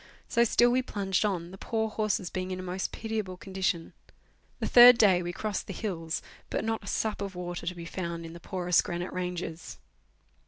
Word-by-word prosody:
So 235 Hz, -, +3 dB
still 240 Hz, +1 st, +4 dB
we 255 Hz, +1 st, +3 dB
plunged 195 Hz, -6 st, -1 dB
on, 175 Hz, -4 st, -2 dB
the 190 Hz, -, -11 dB
poor 220 Hz, -1 st, -1 dB
horses 215 Hz, -4 st, -1 dB
being 185 Hz, 0 st, -3 dB
in 185 Hz, 0 st, -4 dB
a -, -, -5 dB
most 185 Hz, +1 st, -3 dB
pitiable 215 Hz, -5 st, -4 dB
condition. 185 Hz, -3 st, -2 dB, 0.7 s
The -, -, -1 dB
third 245 Hz, 0 st, +10 dB
day 190 Hz, -5 st, +5 dB
we 175 Hz, 0 st, -3 dB
crossed 210 Hz, +3 st, -3 dB
the 195 Hz, -, -5 dB
hills, 165 Hz, -6 st, -3 dB, 0.3 s
but -, -, -2 dB
not 225 Hz, -1 st, -1 dB
a -, -, -11 dB
sup 215 Hz, 0 st, -1 dB
of 195 Hz, -2 st, -4 dB
water 175 Hz, 0 st, -5 dB
to 180 Hz, -, -2 dB
be 170 Hz, -1 st, -8 dB
found 170 Hz, -1 st, -4 dB
in 165 Hz, -, -8 dB
the 170 Hz, -, -9 dB
porous 180 Hz, 0 st, +1 dB
granite 175 Hz, +1 st, -4 dB
ranges. 180 Hz, -2 st, -4 dB
185 Hz, 200 wpm, -29 LUFS, 175-215 Hz, 0.7 s, third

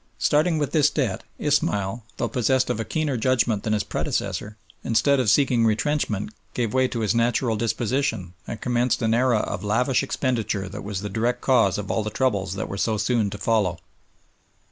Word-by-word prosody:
Starting 155 Hz, +3 st, +2 dB
with 145 Hz, -2 st, -1 dB
this 150 Hz, -2 st, +4 dB
debt, 125 Hz, -12 st, -2 dB
Ismail, 100 Hz, +3 st, 0 dB
though -, -, 0 dB
possessed 130 Hz, +1 st, +1 dB
of -, -, -3 dB
a -, -, 0 dB
keener 150 Hz, 0 st, -1 dB
judgment 120 Hz, -3 st, +1 dB
than 110 Hz, -, -1 dB
his 105 Hz, -2 st, +1 dB
predecessor, 105 Hz, +1 st, -3 dB, 0.3 s
instead 130 Hz, +5 st, +2 dB
of 125 Hz, -5 st, +2 dB
seeking 125 Hz, -1 st, +3 dB
retrenchment, 110 Hz, -2 st, 0 dB, 0.2 s
gave 115 Hz, -4 st, -1 dB
way 130 Hz, 0 st, +3 dB
to 120 Hz, -2 st, -4 dB
his 110 Hz, -1 st, +1 dB
natural 115 Hz, 0 st, +1 dB
disposition, 115 Hz, -3 st, -1 dB
and 115 Hz, -, -5 dB
commenced 125 Hz, 0 st, 0 dB
an 110 Hz, 0 st, +2 dB
era 120 Hz, 0 st, +3 dB
of 100 Hz, -1 st, -4 dB
lavish 120 Hz, +5 st, +2 dB
expenditure 115 Hz, -7 st, -1 dB
that 100 Hz, +3 st, -7 dB
was 100 Hz, -2 st, -4 dB
the 105 Hz, -, -4 dB
direct 115 Hz, +4 st, -1 dB
cause 115 Hz, -8 st, +3 dB
of 105 Hz, -2 st, -4 dB
all 110 Hz, -, +1 dB
the 110 Hz, -, -3 dB
troubles 100 Hz, -6 st, 0 dB
that -, -, -3 dB
were 100 Hz, -, -5 dB
so 110 Hz, +1 st, +1 dB
soon 110 Hz, 0 st, +1 dB
to 100 Hz, -, -6 dB
follow. 100 Hz, -6 st, +1 dB
115 Hz, 190 wpm, -24 LUFS, 105-130 Hz, 0.3 s, this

